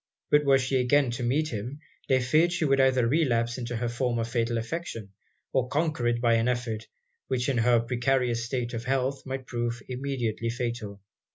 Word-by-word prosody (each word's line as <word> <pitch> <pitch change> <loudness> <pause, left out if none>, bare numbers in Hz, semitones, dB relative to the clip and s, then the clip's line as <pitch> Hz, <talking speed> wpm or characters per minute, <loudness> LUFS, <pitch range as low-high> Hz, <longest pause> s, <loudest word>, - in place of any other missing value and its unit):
But 150 0 +5
were 135 -1 +6
she 130 0 0
again 125 +1 +3
to 120 +1 -4
meet 145 +6 +1
him, 120 +6 -5 0.3
they 130 -1 +4
feared 155 +8 +3
she 175 -2 0
would 135 -1 +3
either 130 -2 +3
relapse 120 -4 +1
into 120 0 -4
her 120 +1 -1
former 120 -1 -1
fatal 115 0 -1
affection, 115 - -5 0.4
or 130 -2 +2
conquer 150 -3 0
it 120 0 +1
by 120 -1 +3
an 115 +1 +1
effort, 120 -3 -2 0.4
which 125 -2 -1
in 135 -4 +1
her 120 0 +4
precarious 120 0 0
state 120 0 -3
of 115 0 -4
health 135 +1 0
might 130 0 -4
prove 120 -1 -2
immediately 125 -4 -2
fatal. 115 -4 -4
125 Hz, 185 wpm, -27 LUFS, 115-135 Hz, 0.4 s, were